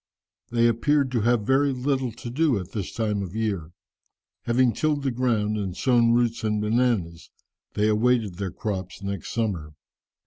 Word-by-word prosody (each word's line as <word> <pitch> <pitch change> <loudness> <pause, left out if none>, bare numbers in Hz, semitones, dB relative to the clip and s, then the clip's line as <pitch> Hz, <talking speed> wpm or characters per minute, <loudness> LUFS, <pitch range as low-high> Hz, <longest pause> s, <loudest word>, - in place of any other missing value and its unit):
They 120 0 +3
appeared 135 +4 +2
to 120 -3 +1
have 120 0 +2
very 140 +3 +3
little 130 -1 -1
to 120 +2 -8
do 145 -2 +2
at 90 0 -6
this 100 -5 -4
time 105 -3 -1
of 95 0 -6
year. 100 -8 -2 0.7
Having 120 0 +3
tilled 150 -2 0
the 135 - 0
ground, 115 -4 0
and 95 -3 -4
sown 120 -3 +3
roots 120 -1 +1
and 105 -1 0
bananas, 105 -6 0 0.5
they 105 +1 +2
awaited 110 -3 +1
their 100 -2 -2
crops 95 0 -5
next 100 -3 -4
summer. 90 -10 -2
115 Hz, 165 wpm, -25 LUFS, 100-125 Hz, 0.7 s, They